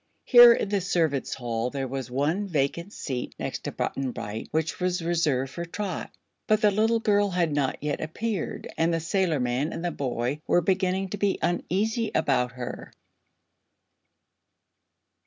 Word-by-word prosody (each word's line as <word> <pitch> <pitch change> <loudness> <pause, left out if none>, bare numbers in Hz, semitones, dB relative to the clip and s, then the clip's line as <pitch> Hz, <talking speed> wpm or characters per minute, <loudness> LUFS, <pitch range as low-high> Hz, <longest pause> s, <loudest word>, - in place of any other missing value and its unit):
Here 240 -2 +10
in 205 - -2
the 200 -1 +1
servants' 165 -7 0
hall 120 -1 -2
there 135 0 -3
was 130 -1 -5
one 150 +11 0
vacant 170 +3 -1
seat 130 - -5
next - - -5
to - - -2
Button 135 -1 -2
Bright 110 -2 -6
which 160 +1 -1
was 180 -1 0
reserved 150 -6 +1
for 170 - -5
Trot; 185 +1 -4 0.4
but 215 0 +4
the 210 -2 +5
little 220 +3 +2
girl 205 -2 +2
had 175 -4 0
not 140 -2 0
yet 150 -1 -2
appeared 195 +4 -3
and 165 +1 +3
the 165 - +1
sailorman 155 -6 0
and 165 - -5
the 175 - 0
boy 130 0 -2
were 175 - +4
beginning 190 +1 0
to 205 - -4
be 200 -1 +1
uneasy 215 +6 0
about 125 -5 +1
her. 125 -1 -7
165 Hz, 155 wpm, -26 LUFS, 135-195 Hz, 0.4 s, Here